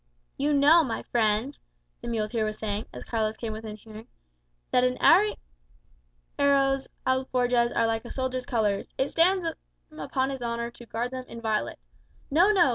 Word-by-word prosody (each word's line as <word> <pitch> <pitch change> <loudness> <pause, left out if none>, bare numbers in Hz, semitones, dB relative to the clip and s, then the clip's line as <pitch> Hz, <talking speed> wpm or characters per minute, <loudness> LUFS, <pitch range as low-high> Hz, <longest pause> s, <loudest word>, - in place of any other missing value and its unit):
"You 285 +2 0
know, 295 +4 +6
my 235 -6 -3
friends," 225 +3 0 0.4
the - - -7
muleteer 220 -1 -1
was 215 0 -3
saying, 210 0 -3
as - - -9
Carlos 220 -1 -1
came 225 -2 -4
within 215 -1 -7
hearing, 220 +1 -12 0.7
"an 250 0 +3
arriero's 270 - 0 0.2
alforjas[#] 250 -2 +1
are 230 - +3
like 225 0 -1
a 240 - -9
soldier's 255 -1 -3
colours, 210 -4 0
it 265 +1 0
stands 360 +2 +3
him 315 -1 -9
upon 265 -1 -1
his 265 -2 -6
honour 235 0 -3
to 240 0 -14
guard 240 +3 -3
them 255 -1 -6
inviolate. 220 -2 -2 0.5
No, 350 +8 +5
no! 360 -9 +4
240 Hz, 155 wpm, -27 LUFS, 220-275 Hz, 0.7 s, know